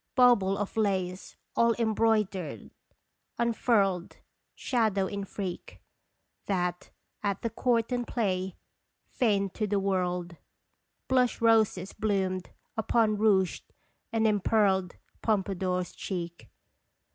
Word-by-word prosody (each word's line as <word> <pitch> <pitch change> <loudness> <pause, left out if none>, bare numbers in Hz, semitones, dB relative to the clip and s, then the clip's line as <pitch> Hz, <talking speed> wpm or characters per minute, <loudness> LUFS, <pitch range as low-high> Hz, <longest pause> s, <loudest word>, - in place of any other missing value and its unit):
Bauble 220 -7 +5
of 205 -1 -4
lace 190 -3 -1 0.2
all 230 -1 +4
embroidered, 215 -7 0 0.7
unfurled 210 -6 +1 0.4
Shadow 220 -6 +1
in 200 0 -4
freak, 190 -2 -6 0.7
That, 180 -2 -1 0.3
at 200 -2 -2
the 230 - -1
court 235 0 +1
and 245 -1 -1
play, 190 -5 -1 0.5
feigned 200 -5 +1
to 215 - -1
the 205 0 +1
world 180 -3 -1 0.7
Blush 255 -2 +2
roses 220 -5 +3
bloomed 190 -3 -1 0.3
upon 220 -1 +2
rouged 195 -4 +2 0.4
and 225 -1 +1
empearled 200 -3 +2 0.3
Pompadour's 190 -4 0
cheek. 170 -3 -6
200 Hz, 100 wpm, -29 LUFS, 185-225 Hz, 0.7 s, Bauble